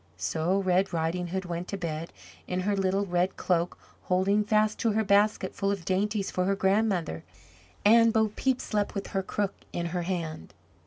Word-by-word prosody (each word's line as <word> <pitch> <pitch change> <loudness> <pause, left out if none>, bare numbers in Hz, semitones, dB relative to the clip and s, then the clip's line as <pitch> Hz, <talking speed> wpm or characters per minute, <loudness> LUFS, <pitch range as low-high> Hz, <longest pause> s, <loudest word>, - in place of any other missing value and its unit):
So 160 - 0
Red 185 +1 +2
Riding 170 +2 -1
hood 190 +2 -3
went 175 0 -4
to 200 - -4
bed 165 -2 -4 0.4
in 180 0 -1
her 200 +2 0
little 195 +1 +1
red 180 0 0
cloak 175 -1 0 0.3
holding 195 +3 +2
fast 215 0 +2
to 225 -2 +1
her 220 +1 +2
basket 205 +1 +2
full 195 -2 -1
of 195 -4 -4
dainties 200 +2 0
for 180 - 0
her 195 +1 +2
grandmother, 190 - +1 0.6
and 230 +2 +6
Bo 220 -1 +2
Peep 260 +4 0
slept 210 -1 -1
with 200 - -3
her 195 - +1
crook 195 +1 -2 0.2
in 175 - -3
her 180 - 0
hand. 170 - -4
190 Hz, 180 wpm, -28 LUFS, 175-205 Hz, 0.6 s, and